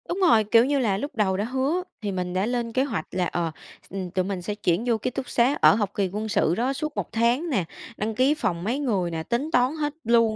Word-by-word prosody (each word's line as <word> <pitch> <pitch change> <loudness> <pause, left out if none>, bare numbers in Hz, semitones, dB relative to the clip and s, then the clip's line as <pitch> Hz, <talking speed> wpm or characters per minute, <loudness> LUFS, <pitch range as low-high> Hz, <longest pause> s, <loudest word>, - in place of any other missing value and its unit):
Đúng 355 - -2
rồi, 325 - +5
kiểu 230 +3 +5
như 280 +1 +1
là, 210 -7 +1
lúc 285 +8 -5
đầu 195 -4 +1
đã 205 - 0
hứa 265 +8 0 0.2
thì 205 -2 -2
mình 180 -1 -3
đã 185 +2 +1
lên 240 0 -2
kế 260 - +2
hoạch 215 - -3
là, 180 -1 0
ờ, 170 -1 -2 0.4
x - - -20 0.2
tụi 185 -1 +1
mình 190 -2 -3
sẽ 205 +4 -4
chuyển 195 -1 0
vô 235 -2 +3
ký 215 - -2
túc 255 +1 -5
xá 250 +4 +3
ở - - +7
học 205 -3 -1
kỳ 195 -2 0
quân 215 +2 -3
sự 205 -4 +2
đó 250 +6 0
suốt 300 +1 -4
1 - - -3
tháng 235 +9 +1
nè, 205 - +1 0.3
đăng 220 +1 -2
ký 260 +5 +4
phòng 170 - -2
mấy 240 +8 -1
người 200 -11 0
nè, 160 -1 -3
tính 240 - -1
toán 250 +4 +3
hết 295 -2 -2
luôn 230 -1 +3
225 Hz, 265 wpm, -25 LUFS, 195-265 Hz, 0.4 s, ở